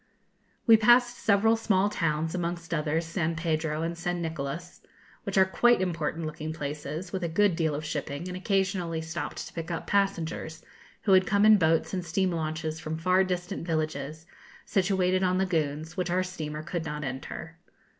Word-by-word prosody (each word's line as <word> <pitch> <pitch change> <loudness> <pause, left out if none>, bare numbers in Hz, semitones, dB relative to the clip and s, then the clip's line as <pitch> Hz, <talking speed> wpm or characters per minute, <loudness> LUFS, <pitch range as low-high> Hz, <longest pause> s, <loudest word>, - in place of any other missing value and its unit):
We 225 -2 +8
passed 240 +2 +4
several 220 +2 +4
small 205 -3 +2
towns, 160 -5 -1
amongst 170 -1 -3
others, 160 +1 0
San 165 -1 -1
Pedro 160 -1 -1
and 170 +1 -2
San 175 +1 -2
Nicolas, 165 +1 -5 0.4
which 200 -1 -2
are 190 - +7
quite 240 +6 +4
important 165 -3 -2
looking 155 0 -4
places, 150 +4 -5
with 190 -1 -2
a 170 - 0
good 200 +2 +3
deal 160 -3 0
of 155 +2 -4
shipping, 145 +2 -4
and 180 - -5
occasionally 185 -3 0
stopped 160 +1 -5
to - - -11
pick 165 0 -5
up 170 - -3
passengers, 170 -5 -1 0.4
who 200 - +2
had 185 -1 +6
come 200 +1 +3
in 215 0 +8
boats 165 +1 +2
and 180 -1 -1
steam 185 +3 0
launches 155 -1 -3
from 160 0 -4
far 185 +3 +3
distant 180 0 -3
villages, 155 -1 -2 0.4
situated 185 -1 +2
on 185 -1 +2
lagunes, 160 -3 -1
which 180 -1 -1
our 185 +1 +2
steamer 155 -5 -5
could 170 0 -3
not 150 -1 -4
enter. 145 +5 -6
170 Hz, 175 wpm, -28 LUFS, 160-190 Hz, 0.4 s, We